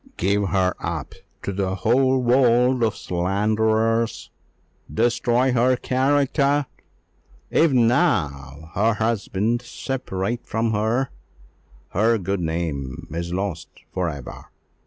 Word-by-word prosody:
"Give 100 +2 +1
her 95 -2 +2
up - - -4 0.3
to 100 - -3
the 95 -1 -1
whole 130 +5 +2
world 125 0 +4
of 110 -3 +1
slanderers! 110 +5 0 0.6
destroy 120 - +2
her 125 +1 +3
character! 140 +2 +1 0.9
If 165 -1 +4
now 80 - +1
her 110 +3 +2
husband 110 +1 0
separate 120 -3 -4
from 115 +1 -1
her, 110 +5 0 0.8
her 115 +4 +2
good 95 0 -2
name 80 -5 -3
is 85 +2 -4
lost 95 -2 -3 0.3
for 90 -2 0
ever! 70 -5 -8
110 Hz, 105 wpm, -23 LUFS, 95-125 Hz, 0.9 s, world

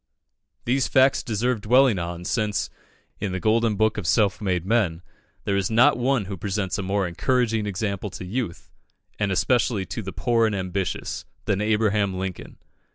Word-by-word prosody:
These 130 +2 +1
facts 130 +1 +4
deserve 115 -1 -1
dwelling 125 -1 +4
on, 85 0 -5
since, 105 -1 -1 0.5
in 100 -2 -2
the 95 - -2
golden 110 +3 +2
book 110 +1 +1
of 90 - -5
self 100 +2 +2
made 90 -4 -1
men, 95 -6 +1 0.4
there 100 - 0
is 100 -2 0
not 115 +2 +5
one 125 -2 +1
who 95 0 -6
presents 100 +1 -2
a - - 0
more 95 0 0
encouraging 115 +3 0
example 100 0 -3
to - - -7
youth, 105 -2 -4 0.5
and 105 -2 0
especially 105 +1 +1
to 115 - -5
the 95 -2 -6
poor 115 0 +2
and 105 - -1
ambitious, 95 0 -3 0.2
than 100 0 0
Abraham 105 -2 +1
Lincoln. 95 -1 -6
105 Hz, 165 wpm, -24 LUFS, 95-115 Hz, 0.5 s, not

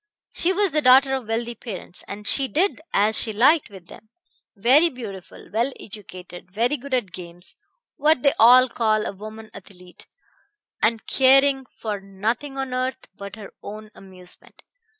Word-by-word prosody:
She 350 - +1
was 395 0 +1
the 305 - +1
daughter 265 +1 +5
of 260 -4 -3
wealthy 235 +1 -2
parents, 200 -6 -8
and 205 +1 -8
she 270 +5 +3
did 340 +4 0
as 210 +2 +2
she 220 - 0
liked 265 +9 +3
with 190 -4 -13
them; 215 +5 -15 0.5
very 260 +11 +4
beautiful, 215 - -10
well 235 +5 0
educated, 185 -3 -11
very 230 +9 0
good 280 -1 -3
at 220 -8 -2
games 175 0 -9 0.4
what 300 -2 +2
they 280 - +5
call 230 -2 +4
a - - -3
woman 215 +2 -11
athlete 180 -2 -14 0.7
and 225 +1 +1
caring 270 0 +4
for 210 -3 -4
nothing 220 +8 -4
on 270 -1 -4
earth 255 +1 -3
but 200 0 -9
her 210 -3 -11
own 215 +1 -9
amusement. 185 -2 -15
225 Hz, 155 wpm, -22 LUFS, 200-265 Hz, 0.7 s, daughter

